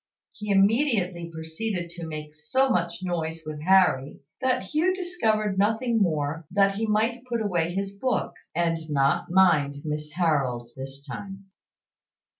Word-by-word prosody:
He 210 -1 -8
immediately 195 - +2
proceeded 170 +3 -4
to 170 -1 -7
make 150 -1 -7
so 260 - +1
much 170 -3 -1
noise 165 -2 -3
with 155 -1 -6
Harry, 175 -7 +3 0.2
that 255 -3 +1
Hugh 320 - +1
discovered 220 - 0
nothing 225 +3 +2
more 155 -3 0
than 195 +1 +4
that 195 - -5
he 225 +1 -1
might 225 +3 +1
put 240 -2 -2
away 175 -5 0
his 195 0 -2
books, 250 +5 -2
and 165 -2 0
not 140 -1 +2
mind 160 -6 +3
Miss 150 0 -3
Harold 135 -8 0
this 135 +1 -8
time. 195 +6 -8
180 Hz, 145 wpm, -26 LUFS, 155-215 Hz, 0.2 s, than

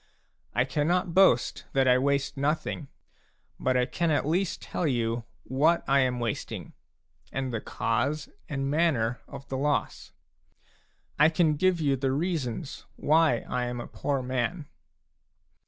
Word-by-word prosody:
I 125 - +3
cannot 160 +6 0
boast 185 -10 +4
that 135 -1 +3
I 125 0 +5
waste 140 +1 0
nothing, 145 +1 -1 0.7
but 130 0 +1
I 125 - +3
can 170 +5 -1
at 150 - +1
least 175 +4 0
tell 175 - -2
you 115 -3 -1 0.2
what 155 +6 +2
I 140 0 +4
am 125 -2 +1
wasting, 115 -3 -4 0.6
and 130 -2 -3
the 115 - -2
cause 145 +6 -1 0.2
and 135 -1 -2
manner 140 -7 +1
of 140 - -10
the 130 - -2
loss; 140 -4 -1 1.1
I 150 +2 +7
can 160 -2 +2
give 185 +3 +2
you 140 -3 +2
the 135 0 0
reasons 150 -2 -3
why 155 -6 +3
I 125 0 -1
am 120 0 -4
a - - -5
poor 140 -2 -2
man. 130 +6 -2
140 Hz, 145 wpm, -28 LUFS, 125-155 Hz, 1.1 s, I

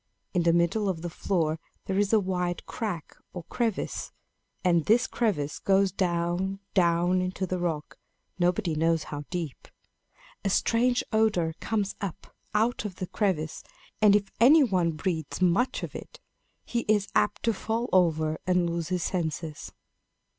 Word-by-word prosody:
In 180 - +2
the 170 0 +4
middle 170 +5 +2
of 170 -3 -3
the 175 - -4
floor 160 -3 0 0.3
there 190 0 0
is 205 -1 +2
a 220 - +5
wide 180 -2 -2
crack, 195 -9 -5 0.2
or 175 - -6
crevice; 230 0 -2 0.5
and 170 -4 +3
this 235 +3 +4
crevice 175 -12 -1
goes 195 0 +3
down, 180 +1 -1
down 175 0 +3
into 185 +1 -2
the 185 0 -2
rock, 160 -4 -3 0.4
nobody 180 0 +1
knows 165 +1 +1
how 145 0 -6
deep. 170 -6 -5 0.8
A 195 - +1
strange 245 +5 +2
odor 210 -7 +2
comes 210 -3 -1
up 195 -5 -6 0.2
out 225 +2 +2
of 205 -4 -5
the 185 - -4
crevice; 175 -6 -1 0.4
and 205 -1 +7
if 200 -1 0
any 285 +7 +7
one 180 -8 +1
breathes 160 -1 -3
much 185 +8 +2
of - - -5
it, - - -9 0.5
he 240 - -1
is 210 -2 +2
apt 210 0 +1
to 230 - +2
fall 225 +4 -2
over 160 -4 +2
and 180 -1 +3
lose 170 -1 -2
his 180 -2 -1
senses." 160 -3 -3
185 Hz, 155 wpm, -27 LUFS, 170-210 Hz, 0.8 s, and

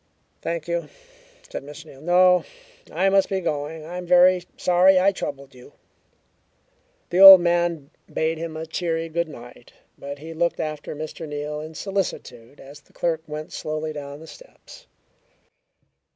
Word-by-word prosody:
"Thank 170 -1 -4
you," 170 0 -3 0.6
said - - -6
Mr. 150 +2 -11
Neal. 140 -3 -15
"No. 180 +1 +4 0.5
I 180 +5 +1
must 195 0 +3
be 195 - -1
going. 155 -2 -4
I 175 +3 -7
am 180 - -8
very 180 0 +5
sorry 180 +1 +4
I 195 +2 +4
troubled 140 -7 -7
you." 125 +3 -16 1.4
The 180 - +1
old 195 -1 +12
man 170 -4 -1 0.2
bade 160 0 -1
him 165 -1 -6
a 160 - -5
cheery 165 0 -3
good 170 +1 -2
night, 120 -3 -13 0.3
but 140 +1 -7
he 160 +3 -9
looked 170 +1 -1
after 155 -1 -5
Mr. 155 +1 -7
Neal 150 0 -5
in 155 +1 -9
solicitude 145 - -5
as 140 +2 -13
the - - -29
clerk 165 -2 -1
went 155 0 -7
slowly 155 0 -4
down 145 0 -8
the - - -11
steps. - - -16
160 Hz, 155 wpm, -23 LUFS, 150-175 Hz, 1.4 s, old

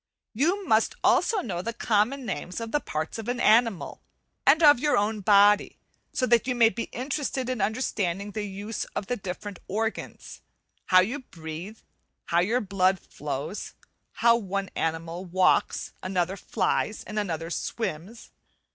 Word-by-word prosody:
You 350 - +1
must 220 0 +3
also 430 -4 +3
know 180 - -3
the 230 +5 -4
common 235 +5 +1
names 185 -2 -4
of 230 -1 -5
the 295 - +2
parts 160 - -4
of 225 - -7
an 245 0 -1
animal, 225 -4 +3 0.5
and 310 +4 +6
of 290 -4 +8
your 295 +2 +2
own 210 +1 0
body, 205 +1 +5 0.3
so 255 - 0
that 240 -1 +3
you 250 - 0
may 230 -2 +6
be 230 0 -4
interested 265 0 -3
in 250 -5 -2
understanding 205 -4 -1
the 215 - -4
use 205 +3 -5
of - - -2
the 245 - -1
different 195 -1 -7
organs; 220 +3 -4 0.5
how 185 -1 +7
you 245 +10 -2
breathe, 170 - -8
and - - -30 0.4
how 170 - +3
your 225 +8 +1
blood 190 -2 +1
flows; 150 +6 -6 0.4
how 235 0 +4
one 195 -2 -3
animal 165 +2 -2
walks, 185 0 +1
another 185 0 -1
flies, 210 +2 -1
and 215 0 -4
another 170 -4 -3
swims. 215 +2 -4
210 Hz, 155 wpm, -26 LUFS, 185-235 Hz, 0.5 s, of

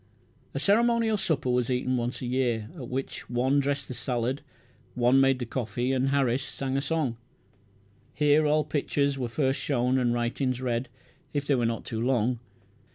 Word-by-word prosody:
A - - 0
ceremonial 230 +1 +3
supper 155 -10 0
was 125 0 +1
eaten 130 0 0
once 120 +2 -2
a - - -2
year, 120 -2 0
at 130 -8 -7
which 130 +1 -4
one 130 +3 +2
dressed 140 0 -1
the - - -5
salad, 125 +2 -2 0.5
one 125 +2 +4
made 135 -1 +4
the 125 - -4
coffee, 120 +1 -2
and 135 0 +1
Harris 135 -2 +2
sang 135 0 -3
a 135 - +1
song. 140 -5 -1 1.0
Here 150 +1 +4
all 150 +1 +3
pictures 140 -2 0
were 125 -2 -2
first 135 +2 0
shown, 130 -1 +1
and 120 -2 +2
writings 120 +2 -1
read 125 0 -1 0.5
if 145 -1 0
they 145 - +2
were 120 -3 +2
not 115 -1 -3
too 110 -1 -3
long. 120 -1 +1
130 Hz, 175 wpm, -27 LUFS, 120-140 Hz, 1.0 s, one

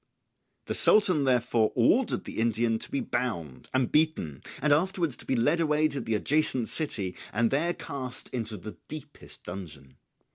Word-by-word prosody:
The - - -2
Sultan 185 -9 +4
therefore 120 -3 +2
ordered 210 - +3
the - - -6
Indian 115 0 +1
to - - -5
be 280 -1 -1
bound 105 - -3
and 130 -1 +1
beaten, 150 - +1 0.2
and 150 +1 +3
afterwards 170 -2 +1
to - - -11
be 130 - +1
led 145 +8 +2
away 155 -1 +3
to 140 -2 -3
the 115 -1 -1
adjacent 130 0 +1
city 100 - -1 0.2
and 115 +2 +1
there 165 +6 +1
cast 135 -4 -6
into 115 -3 -4
the 100 -2 -9
deepest 150 -1 -8
dungeon. 80 -7 -9
125 Hz, 160 wpm, -28 LUFS, 110-155 Hz, 0.2 s, Sultan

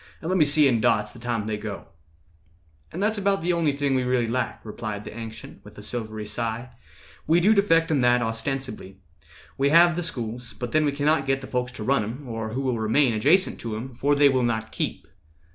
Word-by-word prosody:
And 165 - -5
let 185 - +2
me 155 - +6
see 145 0 +4
in 120 -4 +2
dots 105 0 +2
the - - -12
time 115 -3 -2
they 110 -1 -2
go." 105 -1 -6 1.1
"And 180 +5 -3
that's 215 +1 +1
the 195 -3 +1
only 165 -3 +2
thing 140 -1 -1
we 130 - +2
really 125 -1 +1
lack," 125 +3 -2
Replied 105 -1 -6
the - - -9
Ancient, 115 -1 -9
with - - -15
a - - -9
silvery 110 -3 -4
sigh; 115 +3 -4 0.6
"We 165 +3 +4
do 205 +5 +5
defect 165 -5 +3
in 145 -4 +2
that 120 0 +3
ostensibly. 115 -3 -4 0.6
We 140 +1 +3
have 170 +2 +6
the 175 - -1
schools, 125 -6 -4
but 120 -1 -6
then 155 0 +3
we 145 - +2
cannot 145 0 +1
git 135 0 +1
The - - -7
folks 125 -1 -2
to 110 - -7
run 135 +1 +2
'em, 125 +6 -7
or 110 -2 -4
who 130 - -2
will 130 -4 -1
remain 115 +4 +2
Adjacent 150 - +3
to 115 -2 -4
'em, 125 +4 -6
for 145 +4 +1
they 145 0 +6
will 130 -2 +2
not 110 -2 -1
keep." - - -4
125 Hz, 220 wpm, -25 LUFS, 115-150 Hz, 1.1 s, me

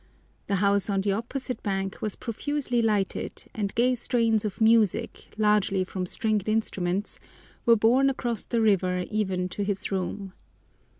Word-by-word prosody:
The 200 - +1
house 200 +1 +2
on 195 -1 +1
the 200 +1 0
opposite 250 +5 -4
bank 195 -1 -3
was 215 -2 -2
profusely 250 +1 -2
lighted, 210 -4 -1
and 200 -3 -3
gay 250 +2 +3
strains 230 -3 +1
of 210 -3 -4
music, 220 -3 +2
largely 210 -3 +2
from 185 0 -4
stringed 215 +1 0
instruments, 200 -3 -1 0.5
were 230 - +8
borne 245 +5 +4
across 240 -5 -2
the 235 -2 0
river 185 -4 +2
even 190 -4 0
to 205 - -3
his 200 0 -3
room. 190 0 -3
210 Hz, 145 wpm, -26 LUFS, 195-230 Hz, 0.5 s, were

